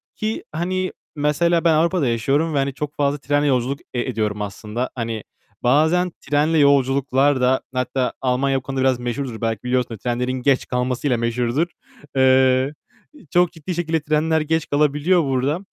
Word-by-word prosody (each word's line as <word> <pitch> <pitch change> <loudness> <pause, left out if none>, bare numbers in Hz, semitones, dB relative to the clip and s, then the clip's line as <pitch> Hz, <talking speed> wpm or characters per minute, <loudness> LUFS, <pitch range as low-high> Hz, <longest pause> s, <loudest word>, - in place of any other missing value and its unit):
Ki 215 +1 -3
hani, 185 +3 -2 0.2
mesela 165 +4 +1
ben 165 -2 +4
Avrupa'da 165 -2 +2
yaşıyorum 140 +8 +1
ve - - 0
hani 135 0 0
çok 145 +1 -5
fazla 145 0 +1
trenle 145 +1 0
yolculuk 130 +1 0
e 120 - 0
ediyorum 105 -4 -2
aslında. 105 +4 -4
Hani 115 -2 -4 0.4
bazen 160 +8 +3
trenle 150 +3 +1
yolculuklar 140 -1 +3
da, 130 +1 +3
hatta 125 0 -1
Almanya 135 +1 +1
bu - - -3
konuda 135 0 -3
biraz 130 -2 +2
meşhurdur, 120 -1 -4
belki 115 -1 -2
biliyorsun 125 -2 -1
trenlerin 125 +3 -2
geç 130 +1 +1
kalmasıyla 125 +1 0
meşhurdur. 120 +7 0 0.5
Eee, 130 +1 +4 0.6
çok 175 -1 +3
ciddi 165 +3 -6
şekilde 165 -1 0
trenler 155 +1 +1
geç 160 +1 -1
kalabiliyor 150 +4 +2
burada. 135 +4 0
135 Hz, 155 wpm, -21 LUFS, 125-155 Hz, 0.6 s, ben